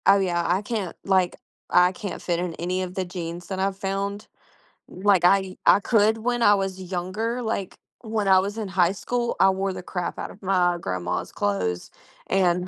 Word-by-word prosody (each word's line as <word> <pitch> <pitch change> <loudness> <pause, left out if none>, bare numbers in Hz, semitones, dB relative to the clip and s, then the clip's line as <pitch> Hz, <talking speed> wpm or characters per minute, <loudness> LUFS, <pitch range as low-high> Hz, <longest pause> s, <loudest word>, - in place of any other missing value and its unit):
Oh 200 0 +7
yeah, 175 -3 0
I 180 +3 +2
can't, 205 -6 -3
like, 190 -2 +2 0.3
I 180 0 +5
can't 195 +1 -6
fit 170 -1 -1
in 175 -1 -2
any 180 +2 -2
of 180 0 -7
the 190 - -1
jeans 175 -1 -6
that 190 -1 -4
I've 195 0 0
found. 200 +1 -3 0.6
Like 190 -1 +2
I 190 +1 +3
I - - +7
could 220 0 +3
when 240 +2 -1
I 205 -2 +6
was 195 -1 -3
younger, 185 +7 -3
like 220 -4 -3 0.3
when 220 -3 -2
I 190 -1 +7
was 200 +3 -3
in 220 -2 -3
high 180 -2 +2
school, 240 +5 -2
I 190 - +6
wore 190 +1 -1
the 185 - -7
crap 180 -1 -4
out - - -5
of 200 - -16
my 180 -2 +2
grandma's 90 - -3
clothes 90 -3 -2 0.4
and 180 -1 +2
190 Hz, 195 wpm, -24 LUFS, 180-200 Hz, 0.6 s, Oh